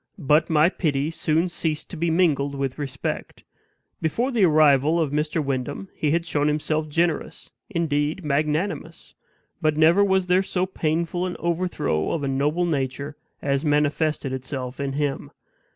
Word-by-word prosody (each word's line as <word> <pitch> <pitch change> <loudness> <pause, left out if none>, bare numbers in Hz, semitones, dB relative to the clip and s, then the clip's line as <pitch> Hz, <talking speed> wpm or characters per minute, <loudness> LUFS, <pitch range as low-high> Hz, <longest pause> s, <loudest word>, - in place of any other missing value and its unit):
But 155 -1 +2
my 155 0 +5
pity 155 -5 -1
soon 165 +1 +1
ceased 160 -3 -3
to - - -6
be 170 +1 0
mingled 150 -5 +2
with 135 0 -3
respect. 135 -3 -4 0.6
Before 235 - 0
the 225 -6 +4
arrival 155 0 +4
of 155 -4 0
Mr. 150 +1 -1
Wyndham 140 +7 -3
he 150 - -1
had 165 +2 +1
shown 150 -3 0
himself 155 +1 0
generous, 165 +1 -1 0.2
indeed 160 -2 -1
magnanimous. 155 +3 -2 0.5
But 155 -1 +1
never 165 +6 +5
was 190 -2 +2
there 180 +1 +3
so 185 -1 -1
painful 170 0 -1
an 180 - -5
overthrow 170 - -1
of 160 - -2
a - - -1
noble 145 +6 +1
nature 140 -2 -2 0.3
as 140 0 0
manifested 150 -1 +1
itself 130 -1 -5
in 140 -1 -2
him. 145 -1 -2
155 Hz, 150 wpm, -24 LUFS, 145-170 Hz, 0.6 s, my